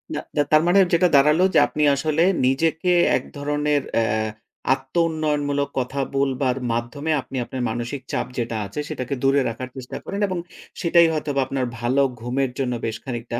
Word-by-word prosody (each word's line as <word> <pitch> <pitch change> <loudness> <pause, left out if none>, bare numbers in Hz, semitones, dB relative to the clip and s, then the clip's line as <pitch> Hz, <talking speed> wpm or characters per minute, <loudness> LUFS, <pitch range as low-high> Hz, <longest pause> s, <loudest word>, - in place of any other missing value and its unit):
না, - - -1 0.2
দা - - +5
তার 155 0 +6
মানে 195 +3 +5
যেটা 180 +2 +5
দাঁড়ালো 150 +5 +5
যে - - +6
আপনি 150 - -2
আসলে 155 +3 +1 0.2
নিজেকে 160 +6 +1 0.3
এক - - -6
ধরনের 145 0 0
অ্যা 115 - +3 0.7
আত্মউন্নয়নমূলক 145 0 -1
কথা 130 +2 -3 0.2
বলবার 135 -1 +1
মাধ্যমে 120 +7 -2
আপনি 135 - -8
আপনার 130 - -5
মানসিক 120 +4 -4
চাপ - - -1
যেটা 115 -1 -2
আছে, 100 +9 -6
সেটাকে 135 -2 -4
দূরে 135 +1 +4
রাখার 125 +3 -6
চেষ্টা 130 -2 -7
করেন। 200 - -5
এবং 185 -2 -3 0.4
সেটাই 170 -1 +5
হয়তোবা 145 -3 -1
আপনার 130 -2 -1
ভালো 130 +4 +2 0.2
ঘুমের 125 +2 -1
জন্য 125 -2 0
বেশ 110 -1 -3
খানিকটা 120 -2 -4
140 Hz, 165 wpm, -22 LUFS, 125-155 Hz, 0.7 s, তার